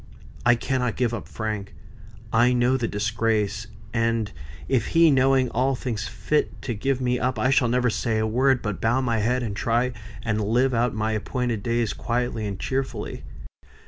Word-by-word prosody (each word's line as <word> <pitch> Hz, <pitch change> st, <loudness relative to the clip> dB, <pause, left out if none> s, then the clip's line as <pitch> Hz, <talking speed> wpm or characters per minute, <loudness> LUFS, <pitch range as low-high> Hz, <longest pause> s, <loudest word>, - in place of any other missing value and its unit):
I 120 Hz, -, +7 dB
cannot 125 Hz, -1 st, -1 dB
give 120 Hz, -2 st, 0 dB
up 115 Hz, -, -5 dB
Frank. 105 Hz, -3 st, -4 dB, 0.6 s
I 120 Hz, +2 st, +5 dB
know 125 Hz, +1 st, +3 dB
the 120 Hz, -3 st, 0 dB
disgrace; 110 Hz, 0 st, -1 dB, 0.3 s
and 115 Hz, -2 st, 0 dB, 0.4 s
if 125 Hz, -5 st, +1 dB
he, 165 Hz, -2 st, +7 dB
knowing 130 Hz, -1 st, +3 dB
all, 130 Hz, +3 st, +1 dB
thinks 115 Hz, -4 st, -3 dB
fit 150 Hz, 0 st, -1 dB
to 120 Hz, -, -2 dB
give 135 Hz, +5 st, -1 dB
me 125 Hz, -1 st, 0 dB
up, 125 Hz, -1 st, 0 dB
I 130 Hz, +5 st, +2 dB
shall 130 Hz, -2 st, +4 dB
never 125 Hz, 0 st, +2 dB
say 110 Hz, 0 st, -1 dB
a 110 Hz, -, +1 dB
word, 130 Hz, +3 st, +2 dB
but 105 Hz, -3 st, -3 dB
bow 120 Hz, +4 st, +2 dB
my 115 Hz, -3 st, 0 dB
head, 125 Hz, +4 st, +1 dB
and 105 Hz, -3 st, -3 dB
try 120 Hz, +4 st, +1 dB, 0.3 s
and 110 Hz, -2 st, 0 dB
live 125 Hz, +5 st, +2 dB
out 120 Hz, 0 st, +1 dB
my 110 Hz, 0 st, 0 dB
appointed 115 Hz, +1 st, -2 dB
days 115 Hz, -1 st, 0 dB
quietly 120 Hz, -2 st, -2 dB
and 100 Hz, -2 st, -5 dB
cheerfully. 135 Hz, 0 st, -3 dB
120 Hz, 175 wpm, -24 LUFS, 110-130 Hz, 0.6 s, I